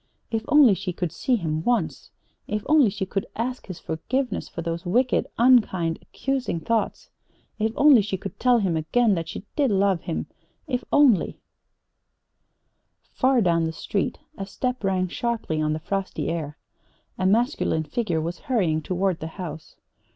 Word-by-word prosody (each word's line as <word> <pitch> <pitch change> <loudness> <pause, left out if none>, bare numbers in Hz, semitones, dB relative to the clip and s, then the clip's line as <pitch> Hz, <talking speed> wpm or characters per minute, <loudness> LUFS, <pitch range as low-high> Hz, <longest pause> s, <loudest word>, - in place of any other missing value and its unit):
If 225 -1 -1
only 290 -7 +7
she 185 -1 -3
could 175 -2 -3
see 250 +8 0
him 160 -6 -2
once. 230 -8 -1 0.4
If 210 -1 -2
only 300 -6 +5
she 195 0 -3
could 195 +1 -3
ask 250 +3 -3
his 185 -3 -6
forgiveness 255 +11 -3
for 170 - -6
those 170 +1 -3
wicked, 245 +8 +1
unkind, 210 -9 +3
accusing 270 -10 -2
thoughts. 230 +4 -2 0.5
If 220 +1 +1
only 280 -5 +7
she 195 -1 -3
could 185 +2 -8
tell 250 -1 +4
him 190 -7 0
again 210 +8 +2
that 165 -2 -3
she 195 - -7
did 285 -4 +2
love 195 -3 +2
him. - - -3 0.4
If 250 -5 -2
only 270 -10 +4 1.8
Far 260 -1 +3
down 170 -4 +2
the 160 - -1
street 195 +4 -2 0.2
a 195 - -4
step 250 +3 -3
rang 185 -1 +1
sharply 220 -6 -2
on 155 0 +1
the - - -1
frosty 195 +4 -3
air. 160 -2 -4 0.6
A 185 - +2
masculine 225 - +1
figure 175 0 -1
was 170 +2 -4
hurrying 175 -11 +1
toward 185 +2 -1
the 160 - -5
house. 160 -4 -7
195 Hz, 160 wpm, -24 LUFS, 170-245 Hz, 1.8 s, only